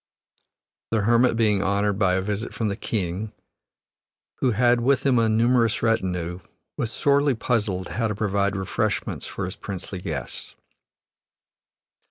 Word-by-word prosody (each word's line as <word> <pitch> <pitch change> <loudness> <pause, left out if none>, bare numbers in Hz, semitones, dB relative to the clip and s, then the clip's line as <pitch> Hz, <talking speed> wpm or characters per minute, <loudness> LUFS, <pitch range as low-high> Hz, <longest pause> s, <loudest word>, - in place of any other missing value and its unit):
The 110 -2 +1
hermit 115 +2 +3
being 105 -4 +3
honored 100 0 0
by 90 -3 +3
a 95 - 0
visit 105 +3 -3
from 110 -2 -1
the 100 - -2
king, 100 -1 -3 1.1
who 130 - +2
had 120 +1 +3
with 135 +3 +2
him 130 -3 +4
a 115 -1 +3
numerous 115 0 +2
retinue, 90 -6 0 0.4
was 115 -2 -2
sorely 140 +2 +2
puzzled 105 -6 -1
how 115 -1 -1
to 105 - -3
provide 100 -1 0
refreshments 95 -1 -2
for - - -4
his - - -6
princely 95 -1 -6
guests. 80 -7 -6
105 Hz, 140 wpm, -24 LUFS, 95-115 Hz, 1.1 s, him